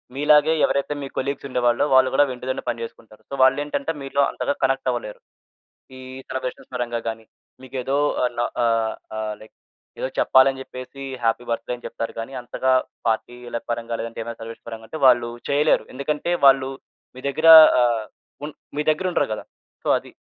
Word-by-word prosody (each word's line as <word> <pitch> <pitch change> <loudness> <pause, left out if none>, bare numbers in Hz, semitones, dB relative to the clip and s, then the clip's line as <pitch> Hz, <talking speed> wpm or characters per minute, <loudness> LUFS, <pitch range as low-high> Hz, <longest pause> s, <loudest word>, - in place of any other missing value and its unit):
మీలాగే 150 +2 +4
ఎవరైతే 140 +1 -1
మీ - - -4
కొలీగ్స్ 140 +1 -3
ఉండేవాళ్ళో, 120 +1 +2
వాళ్ళు 130 0 +6
కూడా 145 - +5
ఇంటి 125 - -16
దగ్గరనే 130 - -3
పని 115 -1 -3
చేసుకుంటారు. 110 -1 -12
సో, - - -9
వాల్లేంటంటే, 145 +3 +1
మీలో 140 +1 0
అంతగా 145 - -2
కనెక్టవ్వలేరు. 130 -5 -1 0.8
ఈ - - -10 0.3
సెలబ్రేషన్స్ 130 -1 -5
పరంగా 120 -1 -2
గాని, 110 0 -7 0.4
మీకేదో 130 +1 -2 0.3
ఆన 120 -1 -2 0.2
ఆహ్, 115 -1 +1 0.2
ఆహ్, 110 -1 -3
లైక్ 110 - -16 0.4
ఏదో - - -1
చెప్పాలని 135 0 +4
చెప్పేసి 130 +1 -10 0.2
హ్యాపీ 115 +1 +1
బర్త్‌డే 115 +1 -2
అని 120 - -15
చెప్తారు 115 - -5
గానీ, 115 +4 -6
అంతగా 130 +2 -1 0.4
పార్టీ‌ల 120 +1 -2
పరంగా 115 0 -3
లేదంటే 115 0 -5
ఏమైనా 115 0 -8
సెలబ్రేషన్ 115 +1 -10
పరంగా 115 -1 -8
అంటే 155 - -7
వాళ్ళు 120 -2 +5 0.2
చేయలేరు. 145 +2 +3
ఎందుకంటే 150 +5 -2
వాళ్ళు 135 -1 +5 0.5
మీ - - -10
దగ్గర 160 +4 0 0.3
ఆహ్, 120 -2 +2 0.4
ఉన్ 150 - -7 0.2
మీ - - +1
దగ్గరుండరు 180 +3 0
కదా! - - -6 0.4
సో, - - -6
అది. - - -10
130 Hz, 160 wpm, -22 LUFS, 115-140 Hz, 0.8 s, వాళ్ళు